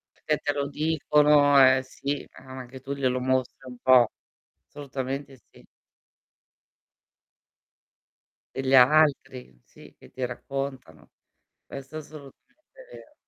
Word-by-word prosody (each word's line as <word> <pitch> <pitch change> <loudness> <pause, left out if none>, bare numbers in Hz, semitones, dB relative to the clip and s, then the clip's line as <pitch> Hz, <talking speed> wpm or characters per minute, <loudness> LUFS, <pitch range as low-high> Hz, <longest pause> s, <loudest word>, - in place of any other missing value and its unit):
Perché 150 -1 -2
te 145 - -2
lo 140 0 -3
dicono, 150 -2 +3
eh, 130 0 +5
sì, 140 +2 -5
ma 130 0 -11
anche 130 +1 -11
tu 140 - -7
glielo 130 -2 -1
mostri 130 0 -1
un 125 - -10
po'. 125 -3 +4 0.6
Assolutamente 135 -1 -7
sì. - - -20 2.9
Degli 135 0 -1
altri, 130 - +3
sì, - - -18
che - - -18
ti 130 - -5
raccontano. 130 - -7 0.6
Questo 135 +2 -10
è - - -4
assolutamente 155 - -16
vero. 300 - -14
135 Hz, 115 wpm, -25 LUFS, 130-145 Hz, 2.9 s, eh